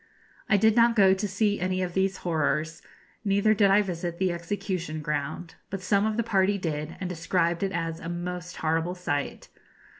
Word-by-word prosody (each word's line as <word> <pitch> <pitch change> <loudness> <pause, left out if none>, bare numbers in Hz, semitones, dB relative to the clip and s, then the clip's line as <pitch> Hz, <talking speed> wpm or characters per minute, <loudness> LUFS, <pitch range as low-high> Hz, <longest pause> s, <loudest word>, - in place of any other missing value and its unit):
I 200 - +5
did 220 +2 +4
not 235 0 +5
go 195 -3 +6
to 195 +2 -1
see 205 +1 0
any 185 +1 0
of 175 -1 -4
these 190 0 +1
horrors, 160 -1 0 0.4
neither 200 +1 +3
did 200 -1 +4
I 205 +2 +5
visit 175 -2 -4
the 185 0 +1
execution 170 -2 -3
ground; 150 +2 -3 0.2
but 195 -1 -5
some 200 +2 +2
of 215 0 -2
the 235 - +2
party 200 -2 +2
did, 155 -3 -4
and 185 - -3
described 170 0 0
it 195 -1 0
as 165 -2 -3
a 170 - -6
most 180 0 -5
horrible 165 +3 0
sight. 145 -6 -3
180 Hz, 185 wpm, -27 LUFS, 165-200 Hz, 0.4 s, go